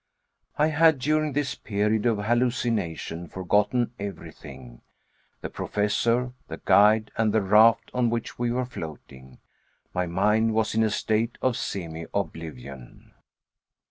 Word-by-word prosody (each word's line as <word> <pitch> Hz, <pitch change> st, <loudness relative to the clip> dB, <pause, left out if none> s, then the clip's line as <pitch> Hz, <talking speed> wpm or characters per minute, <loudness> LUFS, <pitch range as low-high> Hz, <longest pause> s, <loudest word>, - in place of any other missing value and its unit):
I 150 Hz, +1 st, +3 dB
had 160 Hz, 0 st, +4 dB
during 155 Hz, +2 st, 0 dB
this 145 Hz, -1 st, -1 dB
period 105 Hz, +2 st, -1 dB
of 115 Hz, -3 st, +2 dB
hallucination 115 Hz, -8 st, -1 dB
forgotten 105 Hz, +7 st, 0 dB
everything 65 Hz, -11 st, -9 dB, 0.6 s
the -, -, -5 dB
Professor, 115 Hz, +4 st, 0 dB
the -, -, -7 dB
guide, 105 Hz, +2 st, +4 dB
and 110 Hz, -1 st, +2 dB
the 110 Hz, -1 st, +1 dB
raft 110 Hz, +3 st, +4 dB
on 125 Hz, -2 st, +1 dB
which 115 Hz, 0 st, -4 dB
we 120 Hz, 0 st, 0 dB
were 125 Hz, +1 st, -1 dB
floating. 65 Hz, -, -10 dB, 0.6 s
My 90 Hz, 0 st, -1 dB
mind 105 Hz, +5 st, +1 dB
was 110 Hz, 0 st, +1 dB
in 110 Hz, -, +2 dB
a 110 Hz, -, +3 dB
state 110 Hz, +3 st, -1 dB
of 130 Hz, -, +1 dB
semioblivion. 80 Hz, -, -6 dB
110 Hz, 125 wpm, -25 LUFS, 90-120 Hz, 0.6 s, had